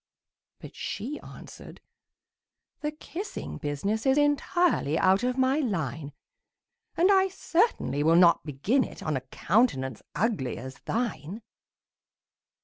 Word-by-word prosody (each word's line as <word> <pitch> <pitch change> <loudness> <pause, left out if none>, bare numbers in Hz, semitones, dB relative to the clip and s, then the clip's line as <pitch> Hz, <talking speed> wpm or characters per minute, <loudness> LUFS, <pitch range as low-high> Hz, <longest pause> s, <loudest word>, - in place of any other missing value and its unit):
But - - -12
she 260 +9 -5
answered, - - -12 1.0
"The 300 - -2
kissing 335 +6 -7
business 195 - -2
Is 265 +1 +4
entirely 290 - +2
out 190 +2 +4
of 250 +1 -1
my 260 +3 +2
line; 160 - -2 0.9
And 360 +4 +5
I 385 -1 +5
certainly 365 - 0
will 160 +2 +4
not 170 -1 +5
begin 165 - +1
it - - -9
On 155 -2 -1
a 130 - -2
countenance 130 - 0
ugly 190 - -1
as 130 +2 -9
thine!" 220 -4 -3
215 Hz, 120 wpm, -27 LUFS, -, 1.0 s, And